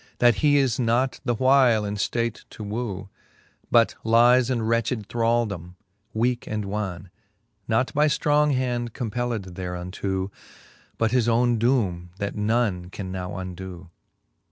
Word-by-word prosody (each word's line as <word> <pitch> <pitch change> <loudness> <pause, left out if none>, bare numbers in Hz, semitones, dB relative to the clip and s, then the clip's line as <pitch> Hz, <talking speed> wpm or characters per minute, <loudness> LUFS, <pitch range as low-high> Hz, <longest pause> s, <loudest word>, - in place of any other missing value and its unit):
That 120 -3 +4
he 145 -1 +5
is 130 -4 +1
not 125 +2 +1
the 120 -2 +1
while 130 -3 +4
in 100 - -3
ftate 115 +3 -2
to 110 - -9
woo; 100 -2 -4 0.6
But 115 -1 +4
lies 120 +2 +5
in 120 -3 0
wretched 115 -1 0
thraldome, 115 -7 -1 0.4
weake 120 +2 0
and 105 -1 -3
wan, 95 -3 -4 0.6
Not 115 +3 +1
by 150 +1 +3
ftrong 150 0 +2
hand 120 -2 -1
compelled 115 -5 -3
thereunto. 95 +2 -4 0.7
But 115 -1 +1
his 120 -2 +2
owne 120 0 +2
doome, 100 -8 +1
that 100 -1 -3
none 105 -4 0
can 95 -1 -6
now 90 -1 -5
undoo. 90 -1 -8
115 Hz, 135 wpm, -24 LUFS, 95-120 Hz, 0.7 s, he